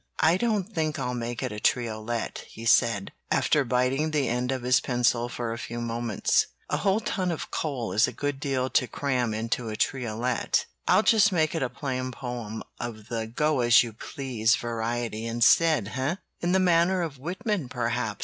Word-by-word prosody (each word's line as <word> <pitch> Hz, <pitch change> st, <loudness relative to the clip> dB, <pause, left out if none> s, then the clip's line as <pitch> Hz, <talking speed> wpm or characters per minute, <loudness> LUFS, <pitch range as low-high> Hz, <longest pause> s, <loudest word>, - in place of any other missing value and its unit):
"I 160 Hz, +2 st, +5 dB
don't 215 Hz, -1 st, +1 dB
think 155 Hz, -2 st, -1 dB
I'll 125 Hz, -2 st, -2 dB
make 120 Hz, -1 st, -4 dB
it -, -, -2 dB
a 105 Hz, -, -5 dB
triolet," 115 Hz, 0 st, -1 dB
he 115 Hz, -, -10 dB
said, 115 Hz, -4 st, +3 dB, 0.2 s
after 150 Hz, -, +3 dB
biting 130 Hz, +5 st, +1 dB
the 150 Hz, -3 st, 0 dB
end 125 Hz, +2 st, -1 dB
of 130 Hz, -2 st, -3 dB
his 125 Hz, +1 st, +4 dB
pencil 120 Hz, -2 st, +1 dB
for 120 Hz, -2 st, -3 dB
a 115 Hz, -, -6 dB
few 120 Hz, 0 st, -5 dB
moments. 115 Hz, -2 st, +1 dB, 0.2 s
"A -, -, +2 dB
whole 200 Hz, +2 st, +1 dB
ton 190 Hz, -5 st, -1 dB
is 135 Hz, -8 st, -1 dB
a -, -, -4 dB
good 145 Hz, -1 st, -3 dB
deal 135 Hz, -3 st, -1 dB
to 125 Hz, -, +2 dB
cram 125 Hz, -5 st, -1 dB
into 115 Hz, +1 st, -2 dB
a 110 Hz, -, -4 dB
triolet. 120 Hz, 0 st, 0 dB, 0.2 s
I'll -, -, +5 dB
just 215 Hz, -2 st, +5 dB
make 160 Hz, -4 st, +1 dB
it 165 Hz, -, -2 dB
a 130 Hz, -, 0 dB
plain 130 Hz, -2 st, -3 dB
poem 120 Hz, -3 st, -6 dB, 0.2 s
of 110 Hz, -3 st, -6 dB
the 115 Hz, -1 st, -2 dB
go 150 Hz, +5 st, +1 dB
as 120 Hz, -1 st, +6 dB
you 115 Hz, -2 st, -7 dB
please 120 Hz, 0 st, 0 dB
variety 115 Hz, -2 st, -3 dB
instead, 120 Hz, +1 st, +4 dB
eh?" 130 Hz, +5 st, 0 dB, 0.2 s
"In 175 Hz, -, 0 dB
the 190 Hz, -, +4 dB
manner 180 Hz, 0 st, +3 dB
of 145 Hz, -5 st, -5 dB
Whitman, 180 Hz, -, -2 dB
perhaps?" 115 Hz, -3 st, -2 dB
125 Hz, 180 wpm, -27 LUFS, 115-150 Hz, 0.2 s, as